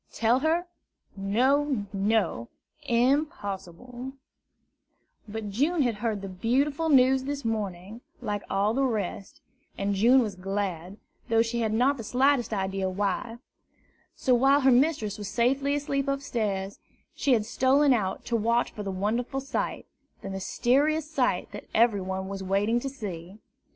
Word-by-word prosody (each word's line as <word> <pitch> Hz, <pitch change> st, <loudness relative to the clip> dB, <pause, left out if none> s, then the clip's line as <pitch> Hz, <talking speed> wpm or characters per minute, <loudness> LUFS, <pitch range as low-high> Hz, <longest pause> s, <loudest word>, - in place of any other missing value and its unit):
Tell 235 Hz, +3 st, +2 dB
her? 325 Hz, +4 st, +1 dB, 0.5 s
No, 250 Hz, +5 st, +1 dB
no, 200 Hz, -, 0 dB, 0.4 s
impossible! 245 Hz, -, -1 dB, 1.1 s
But 210 Hz, -1 st, -5 dB
June 295 Hz, -, +1 dB
had 240 Hz, -2 st, +1 dB
heard 210 Hz, -2 st, -2 dB
the -, -, -4 dB
beautiful 275 Hz, -, 0 dB
news 265 Hz, -1 st, +4 dB
this 285 Hz, -2 st, -4 dB
morning, 210 Hz, -1 st, -4 dB, 0.2 s
like 205 Hz, -1 st, -3 dB
all 200 Hz, +2 st, +1 dB
the 270 Hz, -, 0 dB
rest; 210 Hz, -6 st, -3 dB, 0.4 s
and 200 Hz, 0 st, -1 dB
June 240 Hz, +6 st, +5 dB
was 210 Hz, -3 st, -3 dB
glad, 190 Hz, -1 st, -4 dB, 0.3 s
though 225 Hz, 0 st, +4 dB
she 235 Hz, +1 st, -3 dB
had 220 Hz, -1 st, 0 dB
not 255 Hz, +6 st, +2 dB
the 230 Hz, -, -6 dB
slightest 255 Hz, +2 st, +2 dB
idea 190 Hz, -2 st, -1 dB
why. 205 Hz, +4 st, -2 dB, 0.8 s
So, 255 Hz, -, +1 dB
while 270 Hz, +4 st, +4 dB
her 265 Hz, 0 st, +5 dB
mistress 245 Hz, -6 st, +2 dB
was 205 Hz, -1 st, -5 dB
safely 270 Hz, +6 st, +1 dB
asleep 275 Hz, -1 st, -1 dB
upstairs, 215 Hz, -8 st, -2 dB, 0.3 s
she 275 Hz, -, +1 dB
had 220 Hz, -3 st, +2 dB
stolen 265 Hz, +4 st, +3 dB
out 200 Hz, -6 st, -2 dB
to 235 Hz, -, -1 dB
watch 230 Hz, +2 st, +1 dB
for 210 Hz, -, -7 dB
the 200 Hz, -, -4 dB
wonderful 225 Hz, +8 st, -1 dB
sight, 270 Hz, 0 st, -3 dB, 0.4 s
the 195 Hz, -, -5 dB
mysterious 280 Hz, +10 st, +1 dB
sight 260 Hz, -, 0 dB
that -, -, -8 dB
every 220 Hz, -3 st, +4 dB
one 190 Hz, 0 st, -4 dB
was 195 Hz, 0 st, -5 dB
waiting 200 Hz, +5 st, +1 dB
to 275 Hz, -, -4 dB
see. 195 Hz, -7 st, -7 dB
230 Hz, 145 wpm, -27 LUFS, 200-265 Hz, 1.1 s, June